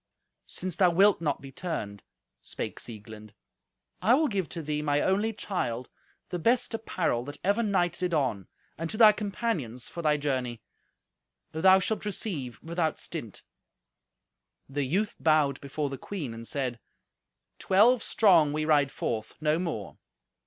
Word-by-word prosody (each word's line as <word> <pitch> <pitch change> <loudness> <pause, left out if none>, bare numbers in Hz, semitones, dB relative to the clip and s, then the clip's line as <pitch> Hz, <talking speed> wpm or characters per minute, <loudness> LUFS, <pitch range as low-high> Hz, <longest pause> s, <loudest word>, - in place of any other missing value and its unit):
"Since 185 -2 -4
thou 185 -2 +5
wilt 195 +2 +4
not 150 -4 -1
be 135 - -10
turned," 125 - -5 0.4
spake - - -5
Sieglind, 110 -1 -9 0.7
"I 220 +7 +5
will 310 +2 +2
give 195 -6 -2
to 165 - -5
thee, 150 0 -2
my 145 -1 +1
only 200 +7 +1
child, 130 - -3 0.4
the 180 - -3
best 240 +8 +2
apparel 180 - -1
that 145 +1 -7
ever 205 +4 +2
knight 180 -6 +1
did 180 0 -1
on, 130 - 0 0.3
and 165 0 -3
to 215 - -4
thy 220 -2 +9
companions, 200 - -3
for 170 - -6
thy 150 -2 +2
journey. 130 -5 -2 0.9
Thou 190 +4 +6
shalt 205 +3 -1
receive 175 - -3
without 165 -1 -1
stint." - - -7 1.2
The 140 0 -2
youth 195 +10 0
bowed 150 -4 +2
before 140 +1 -3
the 135 - -6
queen 155 - -5
and 115 0 -9
said, 130 -5 -2 0.8
"Twelve 225 +6 +4
strong 170 -12 +4
we 155 0 -1
ride 145 -3 +3
forth, 110 -1 -3
no 155 +1 +1
more. 165 - -4
160 Hz, 150 wpm, -28 LUFS, 135-190 Hz, 1.2 s, thy